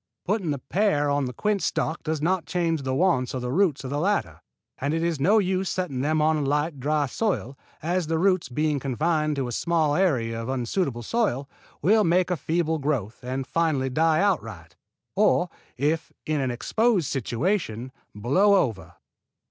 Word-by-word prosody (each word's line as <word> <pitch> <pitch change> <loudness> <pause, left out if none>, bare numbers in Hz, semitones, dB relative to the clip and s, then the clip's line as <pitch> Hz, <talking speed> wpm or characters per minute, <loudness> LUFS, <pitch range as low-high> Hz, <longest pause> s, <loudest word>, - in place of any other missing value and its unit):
Putting 195 -3 0
the 145 - 0
pear 145 - +1
on 140 -1 +1
the 125 - -3
quince 210 - 0
stock 160 +2 -1
does 155 -1 -3
not 180 +1 0
change 165 -3 0
the 130 -1 -2
wants 135 -7 +1
of 125 - -3
the 125 - -2
roots 160 -3 +2
of 130 - -5
the 145 - -1
latter, 200 +5 -1 0.4
and 145 +3 -1
it 165 - -1
is 170 -3 0
no 195 +11 +4
use 190 -2 +1
setting 180 -9 -2
them 155 +2 +1
on 155 0 +3
a - - -1
light, 145 +1 0
dry 150 +2 +1
soil, 140 - -2 0.3
as 175 0 0
the 165 0 0
roots 185 -1 +2
being 150 +3 0
confined 150 +3 0
to 135 -3 -2
a - - -5
small 160 +2 +1
area 120 -11 +1
of 115 - -5
unsuitable 130 0 -1
soil, 140 - 0 0.4
will 215 +6 +5
make 180 +1 +2
a - - +2
feeble 160 +1 -1
growth 135 -8 -2
and 130 +1 -3
finally 145 -4 0
die 160 +3 +3
outright; 110 - -1 0.4
or, - - +3 0.3
if 150 +5 0
in 155 -2 0
an 130 - 0
exposed 205 - +1
situation, 130 - -2 0.2
blow 180 - +3
over. 115 - -1
155 Hz, 180 wpm, -25 LUFS, 130-180 Hz, 0.4 s, will